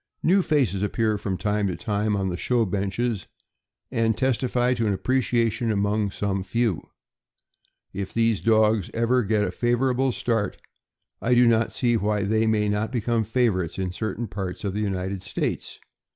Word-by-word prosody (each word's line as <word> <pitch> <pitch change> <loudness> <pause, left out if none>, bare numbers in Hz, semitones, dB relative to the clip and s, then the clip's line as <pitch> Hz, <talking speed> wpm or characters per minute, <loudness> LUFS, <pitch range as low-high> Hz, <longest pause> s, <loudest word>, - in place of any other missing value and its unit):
New 190 +4 +4
faces 135 - +1
appear 110 +1 0
from 95 -2 -3
time 105 +2 0
to 90 - -2
time 105 -1 -1
on 95 -1 -1
the 90 - -2
show 120 +5 +1
benches, 100 +3 -2 0.6
and 115 -1 +1
testify 125 -1 +1
to 115 -3 -1
an 100 - +1
appreciation 120 0 0
among 100 0 +1
some 100 0 -2
few. 105 -1 0 1.1
If 95 0 -4
these 115 -2 +1
dogs 110 -3 +3
ever 115 +2 +2
get 105 -1 +1
a - - -1
favorable 125 +2 +1
start, 115 -4 -1 0.6
I 125 +1 +2
do 120 0 +6
not 115 -1 +3
see 120 -2 +1
why 105 -1 0
they 110 +2 +1
may 105 -1 +2
not 105 +2 -1
become 120 -2 0
favorites 110 -8 0
in 95 -1 -2
certain 110 +4 -3
parts 95 +1 -5
of 100 -2 -2
the 105 - -2
United 95 -2 -2
States. 100 - -3
110 Hz, 165 wpm, -24 LUFS, 100-120 Hz, 1.1 s, do